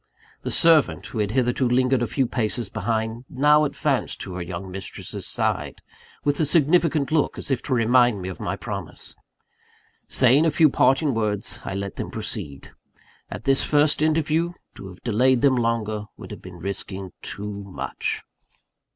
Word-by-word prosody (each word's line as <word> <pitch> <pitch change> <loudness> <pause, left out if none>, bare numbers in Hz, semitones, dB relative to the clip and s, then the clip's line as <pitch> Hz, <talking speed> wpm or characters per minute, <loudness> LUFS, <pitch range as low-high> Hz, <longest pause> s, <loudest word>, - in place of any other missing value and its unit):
The - - -4
servant, 165 -3 +3
who 115 - -5
had 105 -1 +1
hitherto 125 +1 +1
lingered 130 0 +2
a 120 - +1
few 130 +4 0
paces 115 -2 -2
behind, 110 +2 -2
now 150 +3 +4
advanced 145 - -1
to 95 - -6
her 90 - -4
young 90 +2 -6
mistress's 95 0 -5
side, - - -1 0.4
with 145 0 +1
a 155 - +3
significant 155 -1 +3
look, 155 -2 +1
as - - -5
if 130 - +1
to 130 - -1
remind 120 -1 +4
me 90 - -5
of 95 - -6
my - - -2
promise. - - -7 0.9
Saying 130 +4 +4
a 165 - +4
few 155 0 +4
parting 135 +3 +3
words, 105 -3 -1
I 100 - -4
let 100 0 -5
them - - -4
proceed: 70 -2 -5 0.6
at - - -7
this 135 +1 +3
first 150 0 +3
interview, 160 +2 +1 0.2
to 95 - -10
have 90 -1 -13
delayed 125 +2 +2
them 135 -2 +5
longer 115 -3 -1
would - - -10
have - - -8
been 90 -1 -11
risking 95 +1 -5
too 105 +1 -5 0.2
much. 95 - -4
125 Hz, 170 wpm, -24 LUFS, 105-145 Hz, 0.9 s, them